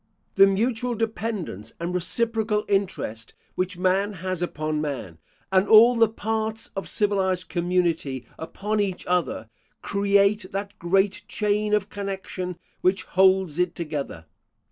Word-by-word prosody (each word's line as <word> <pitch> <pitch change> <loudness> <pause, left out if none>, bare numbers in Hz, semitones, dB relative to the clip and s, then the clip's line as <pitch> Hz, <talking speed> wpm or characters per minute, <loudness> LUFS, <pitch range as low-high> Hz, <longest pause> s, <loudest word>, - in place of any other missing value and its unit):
The 195 - +7
mutual 235 +4 0
dependence 215 - -3
and 170 +1 -3
reciprocal 215 +4 0
interest 180 - -2 0.2
which 185 0 -2
man 190 +3 +1
has 185 -1 -4
upon 155 -3 -2
man, 130 - -5 0.3
and 190 +1 +3
all 230 +3 +8
the 225 -2 +4
parts 220 0 -3
of 195 - -4
civilised 190 -3 0
community 170 -7 0
upon 210 +6 -3
each 195 -3 -1
other, 175 -10 -1 0.4
create 200 0 +2
that 200 +1 -5
great 190 +3 +1
chain 210 0 +1
of 205 -1 -1
connection 190 -3 -5 0.2
which 185 +1 +2
holds 190 -4 +3
it 180 -1 +1
together. 145 - -5
190 Hz, 125 wpm, -25 LUFS, 175-210 Hz, 0.4 s, all